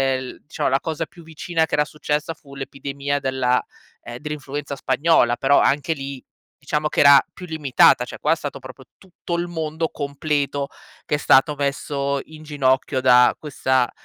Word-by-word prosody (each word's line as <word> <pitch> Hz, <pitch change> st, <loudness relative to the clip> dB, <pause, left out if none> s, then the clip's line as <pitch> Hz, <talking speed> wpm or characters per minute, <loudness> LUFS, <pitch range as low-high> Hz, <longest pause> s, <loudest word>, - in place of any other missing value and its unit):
el 130 Hz, 0 st, -7 dB
diciamo 150 Hz, -2 st, -1 dB
la 135 Hz, +1 st, +1 dB
cosa 160 Hz, 0 st, -3 dB
più 170 Hz, -, -16 dB
vicina 160 Hz, +1 st, -1 dB
che -, -, -2 dB
era 150 Hz, -, +2 dB
successa 150 Hz, +1 st, -3 dB
fu 140 Hz, -2 st, -17 dB
l'epidemia 140 Hz, +1 st, -4 dB
della 130 Hz, -2 st, +1 dB, 0.4 s
ehm, 120 Hz, 0 st, -8 dB
dell'influenza 145 Hz, 0 st, -5 dB
spagnola, 135 Hz, -4 st, +2 dB
però 140 Hz, +1 st, +4 dB
anche 145 Hz, +3 st, +1 dB
lì, 135 Hz, -2 st, -7 dB, 0.4 s
diciamo 150 Hz, +2 st, -1 dB
che -, -, +1 dB
era 140 Hz, -1 st, +8 dB
più 180 Hz, -, -10 dB
limitata, 155 Hz, -6 st, +3 dB
cioè -, -, -9 dB
qua -, -, +1 dB
è -, -, +5 dB
stato -, -, -6 dB
proprio -, -, -12 dB
tutto 175 Hz, -2 st, -7 dB
il 175 Hz, -, -1 dB
mondo 160 Hz, -1 st, -3 dB
completo, 140 Hz, -1 st, -2 dB, 0.4 s
che -, -, -4 dB
è -, -, 0 dB
stato 135 Hz, +1 st, +4 dB
messo 140 Hz, 0 st, -2 dB
in 155 Hz, -1 st, -14 dB
ginocchio 135 Hz, -3 st, 0 dB
da 125 Hz, -1 st, +5 dB
questa 130 Hz, -4 st, 0 dB
140 Hz, 170 wpm, -22 LUFS, 135-155 Hz, 0.4 s, era